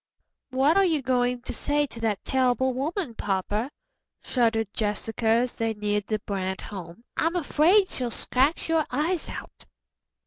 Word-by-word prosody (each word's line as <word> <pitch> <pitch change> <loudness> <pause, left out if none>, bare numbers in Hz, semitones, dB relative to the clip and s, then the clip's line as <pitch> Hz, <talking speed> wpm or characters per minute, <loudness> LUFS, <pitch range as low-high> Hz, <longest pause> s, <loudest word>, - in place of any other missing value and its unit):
"What 270 +6 +3
are 395 - +6
you 320 -7 +1
going 245 -1 +1
to - - -4
say 290 0 +1
to 235 - -10
that 220 -3 -1
terrible 260 0 +2
woman, 295 - -2
papa?" 205 +4 -1 0.5
shuddered 225 -4 +1
Jessica 220 +2 -2
as 235 +2 +3
they 225 -1 -1
neared 210 -1 -1
the 215 - 0
Brant 190 -2 -3
home. 185 0 -8
"I'm 330 +2 +1
afraid 355 +4 +4
she'll 250 -2 -1
scratch 265 +6 +1
your 325 -2 +2
eyes 315 +7 -1
out." - - -9
245 Hz, 150 wpm, -26 LUFS, 215-295 Hz, 0.5 s, are